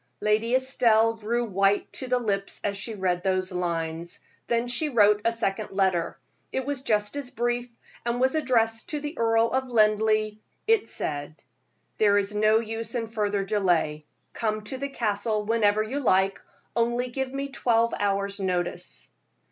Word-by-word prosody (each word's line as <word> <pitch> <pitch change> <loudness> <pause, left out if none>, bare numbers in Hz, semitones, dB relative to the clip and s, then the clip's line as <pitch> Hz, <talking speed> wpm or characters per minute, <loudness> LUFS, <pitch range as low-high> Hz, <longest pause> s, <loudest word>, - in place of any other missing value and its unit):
Lady 215 +3 +2
Estelle 230 -4 +3
grew 230 +2 -1
white 195 -1 +1
to 260 - -4
the 250 0 +2
lips 200 -5 -2
as 200 -1 -1
she 215 +3 -5
read 180 -3 0
those 185 0 0
lines. 170 -1 -3 0.3
Then 235 +1 +1
she 255 +5 0
wrote 210 -4 +4
a 230 - +3
second 225 -4 -2
letter. 190 -3 +1 0.3
It 265 - -2
was 285 -2 -3
just 210 -2 0
as 285 -3 -4
brief, 240 +1 -1 0.3
and 235 +1 -1
was 260 +1 +3
addressed 230 -7 +1
to 300 - -2
the 295 +2 -5
Earl 225 0 +2
of 260 0 0
Linleigh. 215 -2 +2 0.3
It 445 -2 +2
said: 145 +1 -2 0.6
"There 205 -1 +5
is 200 0 0
no 215 +1 +4
use 225 +2 -4
in 230 -2 -2
further 205 -3 -1
delay; 175 -7 0 0.3
come 215 -1 -2
to 260 +5 -6
the 280 +1 -3
Castle 215 -3 -1
whenever 215 -1 +2
you 260 +7 -3
like, 195 -6 +2 0.3
only 240 +2 +1
give 265 +1 -3
me 275 +1 -3
twelve 235 -3 +2
hour's 200 0 0
notice." 180 -2 -2
220 Hz, 165 wpm, -26 LUFS, 200-240 Hz, 0.6 s, There